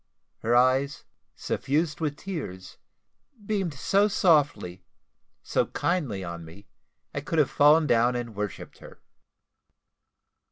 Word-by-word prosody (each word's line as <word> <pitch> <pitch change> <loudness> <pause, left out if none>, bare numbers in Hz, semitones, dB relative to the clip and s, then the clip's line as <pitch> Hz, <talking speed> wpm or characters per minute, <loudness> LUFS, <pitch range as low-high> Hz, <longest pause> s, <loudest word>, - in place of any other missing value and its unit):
Her 120 +2 +1
eyes, 130 +3 +2 0.3
suffused 150 +2 -1
with 150 -2 -2
tears, 95 - -7 0.7
beamed 195 -7 -2
so 200 +9 +2
softly, 145 - +1 0.6
so - - 0
kindly 140 - -2
on 85 -1 -6
me, 85 +6 -13 0.5
I 145 - -3
could 165 +3 -3
have 150 -4 +3
fallen 150 +2 +5
down 120 -2 +3
and 120 -2 -4
worshipped 105 -1 -6
her. - - -14
140 Hz, 115 wpm, -26 LUFS, 105-160 Hz, 0.7 s, fallen